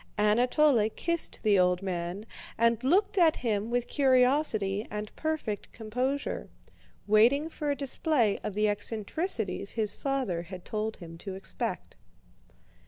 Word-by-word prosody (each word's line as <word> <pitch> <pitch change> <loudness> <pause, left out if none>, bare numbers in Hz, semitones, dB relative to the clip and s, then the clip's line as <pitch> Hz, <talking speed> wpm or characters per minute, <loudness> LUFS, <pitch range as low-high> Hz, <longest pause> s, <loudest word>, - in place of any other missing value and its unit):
Anatole 235 +3 +3
kissed 335 +8 -2
the 205 -3 +4
old 180 +1 +2
man, 180 +2 -4 0.3
and 230 +1 +2
looked 390 +8 +2
at 325 -3 +5
him 220 -2 -1
with 245 0 -1
curiosity 250 -7 +2
and 210 0 -6
perfect 310 -10 -3
composure, 250 +6 -3 0.6
waiting 240 +9 +4
for 300 -2 -4
a 285 - +1
display 275 -4 +1
of 205 - -5
the 210 0 +2
eccentricities 210 - -1
his 215 -3 0
father 260 -11 -2
had 180 +1 -10
told 215 0 -3
him 165 -1 -11
to 195 0 -6
expect. 190 - -4
220 Hz, 130 wpm, -29 LUFS, 205-275 Hz, 0.6 s, at